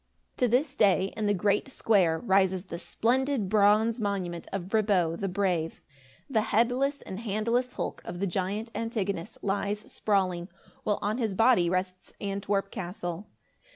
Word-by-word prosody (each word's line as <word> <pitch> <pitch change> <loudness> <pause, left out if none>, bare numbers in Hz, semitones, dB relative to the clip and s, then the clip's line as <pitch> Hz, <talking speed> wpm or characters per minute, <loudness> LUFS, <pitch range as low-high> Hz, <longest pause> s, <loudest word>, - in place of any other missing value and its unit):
To 250 - +3
this 260 +4 +2
day, 195 -6 +3
in 215 -1 -1
the 205 - +3
great 200 +4 +1
square, 195 -10 +2
rises 190 -2 +2
the 170 -3 -7
splendid 255 0 0
bronze 215 +3 +4
monument 185 -5 -2
of 190 -2 -3
Brabo 195 -6 +2
the 195 - -3
Brave. 180 -4 -1 0.5
The 225 -6 +2
headless 250 +6 +1
and 190 - -6
handless 230 +3 0
hulk - - -4
of 175 0 -6
the 200 - 0
giant 200 +5 -2
Antigonus 205 -6 -3
lies 205 +1 -1
sprawling, 185 -4 0 0.3
while 210 - +1
on 215 +4 0
his 220 -5 -1
body 225 -5 +4
rests 185 0 -3
Antwerp 195 0 -1
castle. 175 +1 -5
200 Hz, 150 wpm, -28 LUFS, 185-225 Hz, 0.5 s, bronze